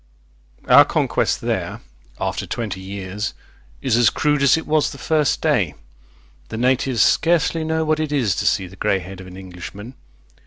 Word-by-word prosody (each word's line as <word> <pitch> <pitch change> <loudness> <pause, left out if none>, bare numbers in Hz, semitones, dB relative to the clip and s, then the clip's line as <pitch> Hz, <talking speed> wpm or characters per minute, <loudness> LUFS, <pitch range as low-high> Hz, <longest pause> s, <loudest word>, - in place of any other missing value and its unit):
Our - - +9
conquest - - 0
there, - - -2 0.4
after - - -3
twenty 105 -5 -4
years, 100 +1 -5 0.5
is 125 -4 +2
as 120 -2 +5
crude 150 +3 0
as 140 +2 +5
it 160 - -5
was 155 -1 +2
the - - -9
first 155 -2 +1
day. - - +1 0.7
The 110 - -5
natives 130 0 +2
scarcely 165 0 +2
know 160 0 0
what 155 0 +1
it 155 -2 -2
Is 120 -10 +1
to - - 0
see 95 - +2
the 90 +1 -12
grey 95 - +1
head 95 0 -9
of 95 - -11
an 90 0 -11
Englishman. 95 +5 -9
120 Hz, 170 wpm, -21 LUFS, 95-150 Hz, 0.7 s, Our